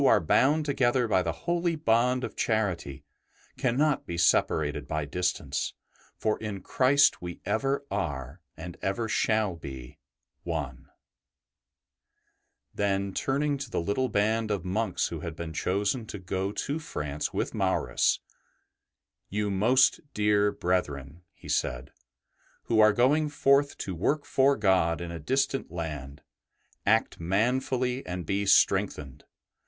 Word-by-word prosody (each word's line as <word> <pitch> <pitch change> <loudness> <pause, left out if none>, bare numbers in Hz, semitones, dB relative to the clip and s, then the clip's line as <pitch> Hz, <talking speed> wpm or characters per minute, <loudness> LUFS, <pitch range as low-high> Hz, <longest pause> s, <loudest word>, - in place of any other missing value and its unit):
BENEDICT 140 - +6
are 95 - 0
bound 150 - +3
together 130 -3 +2
by 95 -4 +3
the - - -1
holy 170 0 +1
bond 125 -2 +2
of - - -5
charity 90 - -1 0.6
cannot 140 +4 +1
be 85 - -4
separated 80 -3 +2
by 75 -1 -2
distance, 80 -3 -2 0.4
for 110 -1 0
in 105 -3 -5
Christ 140 +2 +3
we 85 -1 -6
ever 135 +4 0
are, 75 -5 -4 0.2
and 85 +2 -8
ever 105 +4 -1
shall 110 -3 +1
be, 65 -6 -9 0.4
one/' 70 -6 -4 1.9
Then 100 -1 -1
turning 140 +4 0
to 140 -2 -6
the - - -1
little 100 +9 0
band 110 +1 +1
of 100 -4 -2
monks 95 0 -1
who 85 - -5
had 80 +1 -6
been 80 0 -6
chosen 100 +8 -1
to 105 - -6
go 95 +1 -3
to 145 +8 -3
France 75 - -4
with - - -2
Maurus, 60 - +1 0.5
" - - -60 0.3
You, 105 0 -1
most 120 +7 +4 0.2
dear 105 -1 +3
brethren/' 85 -6 -2
he - - -15
said, 65 +2 -1 0.4
'' - - -37
who 115 - +1
are 110 0 +7
going 145 +8 +2
forth 140 0 +2
to 95 - -4
work 145 - 0
for 135 0 +3
God 95 -6 +2
in 85 -1 -5
a 85 - -6
distant 135 - -1
land, 75 -4 -6 0.6
act 110 +2 +2
manfully 125 +7 0
and 90 -1 -4
be 100 +4 -1
strengthened. 75 -9 +2
100 Hz, 140 wpm, -28 LUFS, 85-125 Hz, 1.9 s, are